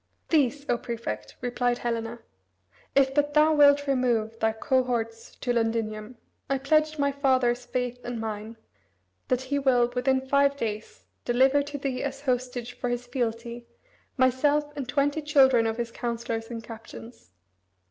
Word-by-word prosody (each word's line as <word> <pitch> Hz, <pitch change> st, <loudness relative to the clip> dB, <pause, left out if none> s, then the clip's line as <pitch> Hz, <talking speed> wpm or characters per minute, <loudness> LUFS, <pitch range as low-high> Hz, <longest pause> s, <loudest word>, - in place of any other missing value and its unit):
"These, 285 Hz, -2 st, +2 dB
O 240 Hz, -, +1 dB
Prefect," 110 Hz, -, -5 dB
replied 245 Hz, 0 st, 0 dB
Helena, 230 Hz, -1 st, -3 dB, 0.7 s
"If 270 Hz, -1 st, +4 dB
but 290 Hz, +1 st, +1 dB
thou 305 Hz, +1 st, +5 dB
wilt 285 Hz, -1 st, +5 dB
remove 240 Hz, -5 st, 0 dB
thy 220 Hz, -1 st, +2 dB
cohorts 230 Hz, -1 st, -1 dB
to 245 Hz, -, -2 dB
Londinium, 225 Hz, 0 st, -2 dB, 0.3 s
I 275 Hz, -, +2 dB
pledge 310 Hz, +3 st, +2 dB
my 280 Hz, -1 st, +2 dB
father's 255 Hz, -3 st, +1 dB
faith 250 Hz, 0 st, -2 dB
and 240 Hz, -1 st, -4 dB
mine, 220 Hz, 0 st, -5 dB, 0.7 s
that 255 Hz, 0 st, +1 dB
he 285 Hz, +2 st, -1 dB
will, 245 Hz, -3 st, +3 dB
within 260 Hz, +1 st, +1 dB
five 280 Hz, +1 st, +3 dB
days, 215 Hz, -3 st, -5 dB, 0.2 s
deliver 265 Hz, +4 st, +3 dB
to 285 Hz, 0 st, -5 dB
thee 265 Hz, -2 st, -3 dB
as 275 Hz, 0 st, -4 dB
hostage 250 Hz, -2 st, -2 dB
for 245 Hz, -, -3 dB
his 245 Hz, 0 st, -2 dB
fealty, 235 Hz, -1 st, -3 dB, 0.5 s
myself 290 Hz, +3 st, +2 dB
and 270 Hz, -4 st, -5 dB
twenty 290 Hz, +2 st, +1 dB
children 265 Hz, -6 st, +4 dB
of 225 Hz, 0 st, -2 dB
his 235 Hz, -1 st, -3 dB
councillors 230 Hz, -1 st, -4 dB
and 230 Hz, -2 st, -6 dB
captains. 225 Hz, -, -11 dB
250 Hz, 145 wpm, -27 LUFS, 230-275 Hz, 0.7 s, thou